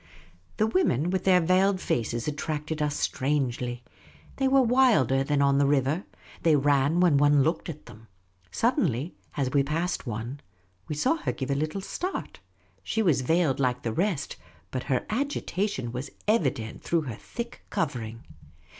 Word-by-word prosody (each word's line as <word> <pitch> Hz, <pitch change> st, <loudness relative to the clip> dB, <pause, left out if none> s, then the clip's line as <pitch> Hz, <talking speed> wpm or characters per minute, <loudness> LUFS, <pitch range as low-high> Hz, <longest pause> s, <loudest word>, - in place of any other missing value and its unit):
The 215 Hz, -, +3 dB
women 180 Hz, -, +1 dB
with 190 Hz, -1 st, -1 dB
their 185 Hz, -1 st, +6 dB
veiled 185 Hz, +3 st, +3 dB
faces 120 Hz, -5 st, -1 dB
attracted 150 Hz, +1 st, -3 dB
us 150 Hz, -1 st, 0 dB
strangely. 125 Hz, -3 st, -1 dB, 0.5 s
They 270 Hz, -, +2 dB
were 270 Hz, 0 st, +5 dB
wilder 230 Hz, -, +4 dB
than 140 Hz, 0 st, +1 dB
on 140 Hz, 0 st, +3 dB
the 140 Hz, -, +3 dB
river. 145 Hz, +5 st, +1 dB, 0.4 s
They 160 Hz, -2 st, +4 dB
ran 145 Hz, +3 st, +3 dB
when 170 Hz, -6 st, +5 dB
one 145 Hz, -1 st, +5 dB
looked 160 Hz, +3 st, -1 dB
at 155 Hz, -2 st, -8 dB
them. 110 Hz, +1 st, -14 dB, 0.4 s
Suddenly, 170 Hz, -, 0 dB, 0.2 s
as 135 Hz, -3 st, 0 dB
we 140 Hz, -, +4 dB
passed 160 Hz, +2 st, -2 dB
one, 120 Hz, +5 st, -4 dB, 0.5 s
we 150 Hz, -, -3 dB
saw 260 Hz, -, +2 dB
her 325 Hz, -, -2 dB
give 135 Hz, 0 st, -4 dB
a -, -, +3 dB
little 155 Hz, +7 st, -2 dB
start. 365 Hz, -, -5 dB, 0.4 s
She 220 Hz, -, -1 dB
was 155 Hz, -9 st, +3 dB
veiled 160 Hz, 0 st, +2 dB
like 125 Hz, -2 st, 0 dB
the 115 Hz, -, -2 dB
rest, 175 Hz, -, -1 dB, 0.3 s
but 130 Hz, -1 st, -3 dB
her 130 Hz, -, +2 dB
agi 280 Hz, +6 st, -2 dB
tation 180 Hz, -, -2 dB
was 130 Hz, +3 st, -5 dB, 0.2 s
evident 140 Hz, -, 0 dB
through 170 Hz, -1 st, +1 dB
her 130 Hz, -6 st, -5 dB
thick 235 Hz, -, -7 dB
covering. 115 Hz, -, -3 dB
150 Hz, 165 wpm, -27 LUFS, 130-185 Hz, 0.5 s, their